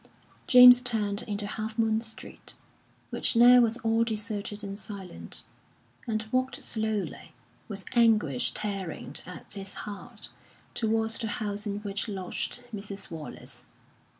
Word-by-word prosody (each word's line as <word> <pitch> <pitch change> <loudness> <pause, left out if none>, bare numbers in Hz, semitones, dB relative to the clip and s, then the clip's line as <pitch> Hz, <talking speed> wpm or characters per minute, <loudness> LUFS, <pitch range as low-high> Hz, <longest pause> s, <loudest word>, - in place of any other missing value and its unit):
James 250 -1 +10
turned 215 -4 0
into 205 -1 0
Half 220 +2 -4
Moon 220 -1 +2
Street, 220 -1 -5 0.6
which - - 0
now 245 +2 +8
was 230 0 +2
all 225 -1 +2
deserted 210 -2 -2
and 200 0 -6
silent, 195 -3 -4 0.6
and 220 -1 -1
walked 255 0 0
slowly, 220 -2 -2 0.3
with 200 -4 -6
anguish 215 - +3
tearing 195 -6 -3
at 180 - -8
his 195 -2 -3
heart, 205 -2 -7 0.4
towards 225 0 +1
the 225 - -1
house 205 0 -2
in 205 0 -3
which 200 0 -3
lodged 200 +4 -3
Mrs. 200 -2 -6
Wallace. 160 -2 -8
215 Hz, 125 wpm, -28 LUFS, 200-225 Hz, 0.6 s, James